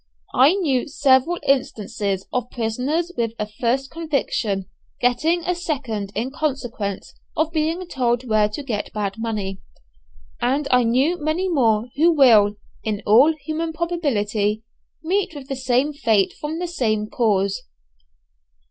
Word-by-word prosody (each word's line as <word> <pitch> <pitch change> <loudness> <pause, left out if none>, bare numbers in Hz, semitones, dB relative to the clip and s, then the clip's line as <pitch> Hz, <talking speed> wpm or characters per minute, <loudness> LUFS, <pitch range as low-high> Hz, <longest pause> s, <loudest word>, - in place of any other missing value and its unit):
I 285 +8 +5
knew 285 -11 0
several 280 +3 +3
instances 210 -7 0
of 250 -1 -1
prisoners 255 +10 -1
with 230 -2 -1
a 210 - -2
first 240 +5 -1
conviction 275 - -1 0.3
getting 310 +8 +1
a 360 - 0
second 260 - -3
in 235 +6 -2
consequence 245 -9 -3 0.2
of 315 0 +1
being 325 +3 -1
told 250 -4 0
where 215 -2 +3
to 215 +7 -6
get 220 -6 -3
bad 205 -1 -2
money; 205 -4 -3 0.8
and 270 +4 +1
I 250 -1 +4
knew 275 +8 +1
many 320 +5 0
more 235 - +2
who 335 +4 +5
will, 220 -8 +6 0.3
in 210 -2 -2
all 260 +10 +6
human 320 +1 -3
probability, 225 -11 -1 0.4
meet 375 +1 0
with 280 -1 -9
the 270 - -2
same 260 +3 +1
fate 220 -9 +2
from 300 +2 -5
the 355 - -2
same 220 -11 0
cause. 200 -1 +1
255 Hz, 140 wpm, -22 LUFS, 215-310 Hz, 0.8 s, will